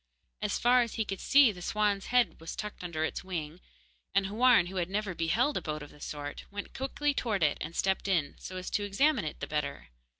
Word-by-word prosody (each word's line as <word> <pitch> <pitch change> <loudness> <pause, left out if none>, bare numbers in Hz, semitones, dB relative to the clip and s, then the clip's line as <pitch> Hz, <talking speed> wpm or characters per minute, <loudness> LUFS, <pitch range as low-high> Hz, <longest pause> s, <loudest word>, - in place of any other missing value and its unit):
As - - 0
far 245 +1 +5
as 235 -2 -2
he 220 - 0
could 195 -1 -4
see, 275 -4 +6
the 180 -3 -10
swan's 205 +1 0
head 240 -11 +2
was 165 - -6
tucked 210 -3 -6
under 160 -3 -1
its - - -4
wing, 170 -2 -5 0.5
and 195 0 +4
Houarn, 225 -1 +5
who 190 +2 -6
had 175 -1 0
never 200 -1 -1
beheld 175 - +1
a - - -2
boat 155 -1 -4
of 145 - -11
the 150 - -17
sort, 145 -1 -6
went 205 0 -7
quickly 285 +2 -1
towards 210 - +1
it 145 - 0
and 165 +2 -5
stepped 190 +1 +1
in, 165 -7 +1
so 185 - -7
as 185 - -5
to 205 - 0
examine 220 - +2
it 155 - -6
the - - -1
better. 140 - -3
195 Hz, 230 wpm, -30 LUFS, 165-220 Hz, 0.5 s, see